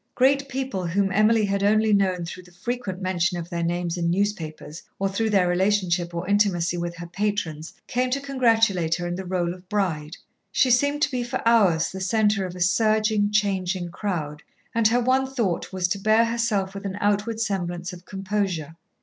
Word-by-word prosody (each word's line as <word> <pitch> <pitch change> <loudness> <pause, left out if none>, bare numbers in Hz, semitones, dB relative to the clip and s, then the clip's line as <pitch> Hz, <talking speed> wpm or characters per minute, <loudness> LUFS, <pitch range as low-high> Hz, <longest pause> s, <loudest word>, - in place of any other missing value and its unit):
Great 275 +2 +3
people 260 -9 -3
whom 195 +3 +1
Emily 215 +3 +3
had 200 0 -1
only 215 +1 +3
known 185 -3 +1
through 180 +2 -7
the 180 0 -19
frequent 200 0 -4
mention 185 -1 0
of 170 0 -7
their 170 -1 -2
names 175 +1 -1
in 170 0 0
newspapers 170 -5 -2 0.2
or 195 - 0
through 220 +3 -1
their 195 -4 +3
relationship 180 -1 +1
or 170 +1 -4
intimacy 195 -4 +2
with 170 0 -3
her 175 0 -7
patrons, 180 -4 -3
came 250 +1 0
to 270 +2 0
congratulate 225 -11 +2
her 175 - -4
in 175 0 -2
her 190 - -5
rôle 175 -2 -1
of 180 0 -15
bride. 170 -6 -2 0.3
She 255 - +3
seemed 285 +4 +2
to - - +1
be 250 -1 -1
for 240 -1 -3
hours 195 -9 +4
the 190 - -7
centre 205 0 +1
of 180 - -9
a 180 - -7
surging, 215 +2 +2
changing 190 -4 0
crowd, 160 -7 -4 0.3
and 230 -1 +4
her 240 +2 +2
one 260 +2 +2
thought 230 -10 -2
was 185 -1 0
to 200 - -1
bear 215 +3 +4
herself 225 -5 -1
with 200 0 -8
an 195 0 -5
outward 205 +2 0
semblance 180 -4 -2
of 175 -1 -11
composure. 190 -5 -3
195 Hz, 190 wpm, -24 LUFS, 175-220 Hz, 0.3 s, hours